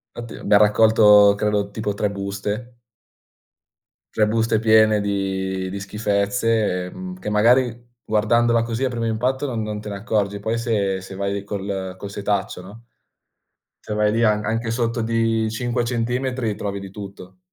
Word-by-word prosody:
Infatti, 120 -1 -7
abbiam 100 0 +3
raccolto, 105 -1 +6
credo, 105 -1 0
tipo, 105 -1 -3
3 105 +1 -1
buste. 100 +4 -5 1.4
3 105 - +3
buste 110 0 +1
piene 110 -1 +4
di 95 -2 -2
di 100 - -5
schifezze, 105 -1 0
ehm, 185 - -8
che, - - -4
magari, 120 +3 +2 0.2
guardandola 115 +2 +2
così, 115 +2 -3
a 130 - +1
primo 120 -2 -3
impatto, 125 +5 -1
non 120 -5 -3
non 105 -1 -4
te 105 - -7
ne 100 - -5
accorgi. 100 -1 -1
Poi, 110 +3 -2
se 100 -5 -1
se 95 0 -10
vai 100 0 -3
col 95 -2 -4
col 100 - -7
setaccio, 100 -2 -2
no? 105 +6 -13 1.0
Se 105 - -5
vai 105 0 +2
lì, 115 +2 +1
an 105 -1 +2
anche 115 +1 -1
sotto 115 0 -1
di 115 -1 0
5 120 +2 -1
centimetri, 120 -1 -1
trovi 100 -1 -4
di 95 -1 -9
tutto. 100 - -10
105 Hz, 160 wpm, -22 LUFS, 100-115 Hz, 1.4 s, raccolto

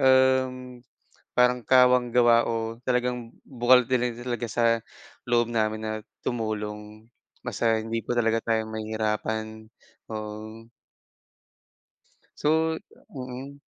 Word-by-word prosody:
um, 130 -1 +3 0.6
parang 125 0 +4
kawang 125 0 +5
gawa 120 -1 +6
o 115 0 -2
talagang 125 -2 -1 0.2
bukal 125 -1 +4
din 125 -2 +1
talaga 120 -1 -3
sa 120 +1 +1 0.6
loob 120 -1 +3
namin 110 -1 0
na 110 0 -2 0.3
tumulong. 105 -1 -4 0.4
Basta 115 -1 +1
hindi 115 +1 -3
po - - -2
talaga 115 -1 +2
tayo 110 -1 +1
mahihirapan. 110 0 -3 0.4
Oo. 110 +1 -7 1.7
So 160 +2 +2 0.4
mm. 130 +2 -7
120 Hz, 100 wpm, -26 LUFS, 110-125 Hz, 1.7 s, gawa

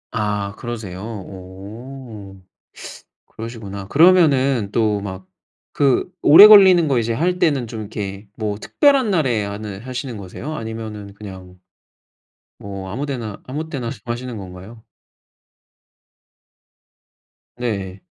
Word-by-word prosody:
아, 105 -2 -2
그러세요? 110 -6 -6
오. 105 +2 -9 0.9
그러시구나. 105 -4 -8
그러면은 140 - +4
또 105 -3 +1
막 95 -2 -7 0.5
그 140 +5 +2
오래 165 +8 +10
걸리는 190 -6 +8
거 130 -4 +2
이제 115 0 -1
할 180 +8 0
때는 145 -8 +2
좀 110 -1 -7
이렇게 100 -1 -6
뭐 105 -2 -2
특별한 275 - +3
날에 130 - +1
하는 100 0 -6
하시는 125 -2 -6
거세요? 100 +10 -7
아니면은 110 -4 -7
그냥 95 -3 -11 1.0
뭐 100 -1 -7
아무 130 +9 -3
데나 115 -7 -5
아무 155 +5 -5
때나 125 -6 -4
하시는 120 0 -5
건가요? 95 +4 -11 2.7
네. 100 -6 -4
110 Hz, 230 characters per minute, -20 LUFS, 100-135 Hz, 2.7 s, 오래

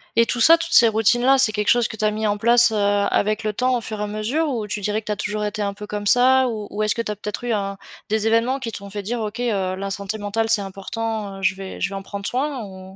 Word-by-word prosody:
et 230 0 +4
tout 245 - -1
ça, 330 +7 +7
toutes 335 - -3
ces 230 -2 +7
routines-là, 240 +5 +3
c'est 220 -5 +4
quelque 210 -1 -1
chose 240 -1 +4
que 220 - -9
tu 215 - -1
as 215 - +3
mis 215 +1 -2
en 205 0 0
place, 235 +2 +4
heu, - - -2
avec 205 +1 +1
le 215 - 0
temps 255 +4 0
au 240 - -2
fur 215 -1 -6
et 210 - -1
à - - -1
mesure 215 +10 -1
ou 230 -7 -3
tu 205 - -3
dirais 210 +2 -1
que - - -30
tu - - -1
as 210 - 0
toujours 210 +1 -3
été 210 0 -2
un 200 0 -2
peu 210 +1 -9
comme 205 0 -5
ça? 255 +3 +5
Ou 215 -3 -5
ou 210 +1 -2
est-ce 215 - +1
que 230 - -2
tu 210 - -4
as 210 - -4
peut-être 210 +3 -6
eu 240 - -1
un 200 -2 -2 0.3
des 220 0 0
événements 230 +4 +2
qui 235 -3 -5
t'ont 200 -2 -8
fait 205 0 -4
dire: 230 +4 -3
«OK, 215 +1 -5
heu, 200 -6 -1
la 195 +1 -4
santé 200 +2 -4
mentale 215 +2 -2
c'est 225 -2 +3
important, 200 +1 -5
heu, - - -10
je 190 0 +1
vais 190 0 -8
je - - 0
vais 195 - -7
en 195 - -6
prendre 200 +1 -6
soin», 265 -1 -2
ou? 190 -2 -10
215 Hz, 310 wpm, -22 LUFS, 205-235 Hz, 0.3 s, ça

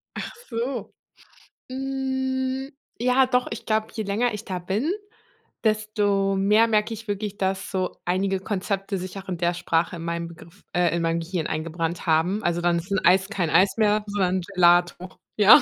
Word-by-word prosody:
Ach - - -5 0.2
so. 240 +2 -3 0.8
Hm, 265 0 -2 0.3
ja 250 +3 +4
doch, 250 -1 +1
ich 225 - -6
glaube, 220 0 +1
je 220 - -2
länger 215 +4 0
ich 210 +1 -6
da 185 -1 -3
bin, 195 - -1 0.7
desto 210 -3 +1
mehr 210 +4 +4
merke 215 0 +1
ich 225 0 -9
wirklich, 205 0 -3
dass 190 0 -1
so 185 -2 -2
einige 190 +2 +1
Konzepte 195 0 -2
sich 185 +2 -6
auch 195 0 -8
in 180 - -2
der 175 +1 +1
Sprache 170 0 0
in 165 - -7
meinem 170 0 -3
Begriff 170 +3 -15
äh, 175 -1 +2
in 170 - 0
mein 165 0 +1
Gehirn 165 -1 -3
eingebrannt 165 +2 -3
haben. 165 +6 +2
Also, 175 0 0
dann 175 0 +2
ist 180 +4 -10
'n 195 - +2
Eis 190 +2 +5
kein 180 -7 -1
Eis 185 +6 +4
mehr, 210 -1 +3
sondern 190 -2 +1
Gelato. 175 -1 +2 0.2
Ja. 215 +7 +9
195 Hz, 175 wpm, -25 LUFS, 175-220 Hz, 0.8 s, Ja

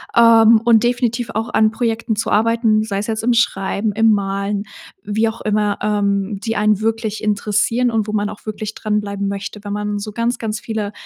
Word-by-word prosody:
ähm, 230 -1 +6
und 230 -1 +4
definitiv 240 -1 0
auch 225 +2 -3
an 220 0 +3
Projekten 225 -1 -1
zu 220 - -2
arbeiten, 220 0 +2
sei 205 -2 -3
es 205 - -4
jetzt 220 -1 -2
im 245 +1 +3
Schreiben, 205 -2 0
im 225 +1 +4
Malen, 200 0 -1 0.4
wie 215 +2 0
auch 225 +1 -9
immer, 210 -1 0
ähm, 200 -1 0
die 225 +2 -3
einen 210 -1 +2
wirklich 220 -1 -2
interessieren 215 +3 +1
und 220 -2 0
wo 210 - -4
man 205 -1 0
auch 210 - -11
wirklich 215 0 -5
dranbleiben 205 -2 -2
möchte. 200 +1 -5
Wenn 205 -1 -5
man 210 0 -2
so 210 +1 -6
ganz, 230 +3 -1
ganz 215 -1 -4
viele 215 -3 -4
215 Hz, 195 wpm, -18 LUFS, 205-225 Hz, 0.4 s, ähm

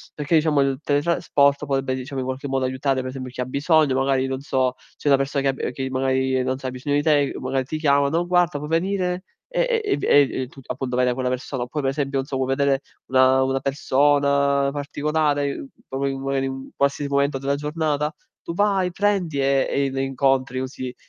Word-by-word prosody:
perché 150 +2 -3
diciamo 150 -2 +3
il 135 -1 0
teletrasporto 145 -1 +2
potrebbe 135 -1 0
diciamo 130 +1 -4
in - - -4
qualche 130 +2 -4
modo 135 -1 0
aiutare 130 +1 0
per 130 - -5
esempio 130 -1 -6
chi 125 - -5
ha - - -1
bisogno, 145 +1 +2
magari 135 0 +1
non 135 0 -3
so, 130 -2 0 0.2
c'è 145 - -1
una 140 - +6
persona 135 0 -1
che 135 - +2
ha - - 0
b - - -6
che 135 -1 -3
magari 130 0 +1
non 130 0 -1
sa 130 -1 -4
ha - - -7
bisogno 145 +3 -2
di 145 - +2
te, 145 -3 +2
magari 130 0 -1
ti 155 +4 -4
chiama, 140 -2 +3
"Non 170 +3 0
guarda, 175 -4 +2
puoi 150 +1 -6
venire" 180 +1 0 0.3
e - - +1
e 410 - 0
v - - -8
e, 140 -2 +4
uhm, 130 - -6
tu 135 +1 -14
appunto 130 -2 -4
vai 125 - +2
da 125 - +2
quella 130 0 -2
persona. 130 0 -3
Oppure, 145 +5 -4
per 135 - +1
esempio 140 -1 -1
non 135 - -2
so 135 - -3
puoi 130 0 0
vedere 140 -1 +2 0.3
una 130 0 +4
una 135 0 0
persona 140 0 +2
particolare, 145 0 -1 0.2
proprio 135 +1 -1
magari 135 0 -1
in 135 - -2
un 135 0 -9
qualsiasi 140 0 0
momento 140 0 +1
della 135 +1 -1
giornata, 150 0 -1 0.3
tu 170 - -5
vai, 195 -2 +1
prendi 185 -8 0
e 135 0 +2
e 140 -1 0
le 135 0 -1
incontri 135 -1 +1
così, 130 -1 -6
140 Hz, 220 wpm, -23 LUFS, 130-150 Hz, 0.3 s, una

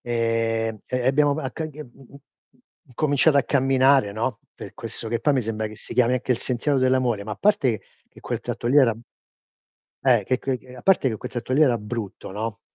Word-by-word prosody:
e 115 -1 -1
e 125 - -2
e 125 - -2
abbiamo 145 +2 +3
a 130 - -4
che 160 -1 -4
c 150 - -16
mhmm, 130 +1 -16 0.7
incominciato 145 +3 +2
a 140 - +5
camminare, 135 -4 +3
no, 115 +2 -2 0.2
per - - -10
questo 115 - -6
che 115 +1 -1
poi 145 -2 +2
mi 130 - +2
sembra 110 0 -3
che 110 - -9
si - - -10
chiami 125 0 +3
anche 125 0 0
il 120 - -2
sentiero 135 +3 0
dell'amore, 130 -4 +1
ma 105 - -5
a - - -6
parte 140 - +2
che - - -29 0.2
dche - - -17
quel - - -4
tratto - - -5
lì 130 +5 +3
era 120 -5 +4 1.1
eh 120 -6 +4
che 130 +4 0
che 130 -1 -4
a 125 - -10
parte 190 -6 +3
che 110 - -3
quel - - -7
tratto 120 +1 -4
lì 145 - +3
era 125 -6 +5
brutto, 105 -2 -6
no, 110 +3 -5
125 Hz, 215 wpm, -23 LUFS, 115-135 Hz, 1.1 s, a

